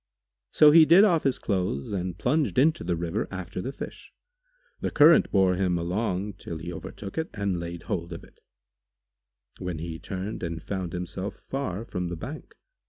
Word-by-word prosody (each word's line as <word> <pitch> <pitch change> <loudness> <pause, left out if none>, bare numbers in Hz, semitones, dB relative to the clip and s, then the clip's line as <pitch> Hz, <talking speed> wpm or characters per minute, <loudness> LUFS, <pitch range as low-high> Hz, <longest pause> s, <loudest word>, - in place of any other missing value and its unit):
So 150 -1 +7
he 165 +1 +9
did 170 +6 +7
off 175 -7 +4
his 135 -2 +1
clothes 90 -8 -2
and 90 -3 -3
plunged 145 +2 0
into 155 +4 +3
the 85 0 0
river 85 0 -2
after 95 -1 -5
the 130 - -4
fish. - - -9 0.7
The - - -1
current 160 +2 +6
bore 95 -2 +4
him 90 -2 +1
along 95 +3 -2
till 85 - -6
he 85 +2 -6
overtook 100 - -7
it 160 - -2
and 100 -4 -1
laid 85 -1 -6
hold 85 -1 -3
of 85 - -7
it, - - -19 1.2
when 90 -3 -4
he 80 0 -5
turned 95 +2 -5
and 85 -2 -3
found 95 -4 -4
himself 90 +3 -4
far 115 -6 -4
from 90 -5 -3
the 85 -1 -5
bank. 145 - -8
95 Hz, 175 wpm, -27 LUFS, 85-125 Hz, 1.2 s, he